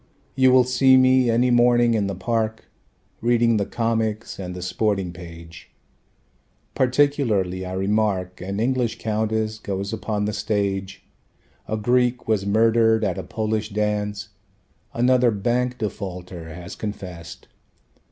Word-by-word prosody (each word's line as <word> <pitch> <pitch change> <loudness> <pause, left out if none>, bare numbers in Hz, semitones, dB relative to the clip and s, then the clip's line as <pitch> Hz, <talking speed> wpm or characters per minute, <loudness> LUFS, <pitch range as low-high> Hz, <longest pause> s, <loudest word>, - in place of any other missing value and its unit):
You 130 -1 +4
will 130 0 +6
see 130 +1 +4
me 130 -1 +4
any 120 +2 +2
morning 120 -1 +4
in 105 -3 +1
the 100 - -3
park 110 +2 -2 0.6
Reading 115 -1 +3
the 100 - -1
comics 115 -2 -2
and 90 -1 -6
the 90 - -7
sporting 95 -1 -1
page. 85 -1 -12 1.0
Particularly 125 -9 +1
I 90 - -5
remark 95 -2 -1
An 100 +2 -4
English 125 0 0
countess 110 0 -1
goes 100 0 -4
upon 105 -2 -2
the 105 - -2
stage. 100 -2 -2 0.6
A 110 - -2
Greek 125 +2 +1
was 105 -3 0
murdered 110 +1 +3
at 95 -4 -1
a - - -5
Polish 110 -1 -2
dance, 105 0 -2 0.6
Another 125 0 +3
bank 120 +4 -1
defaulter 90 -5 -6
has 90 +4 -9
confessed. 90 -6 -8
110 Hz, 130 wpm, -23 LUFS, 95-120 Hz, 1.0 s, will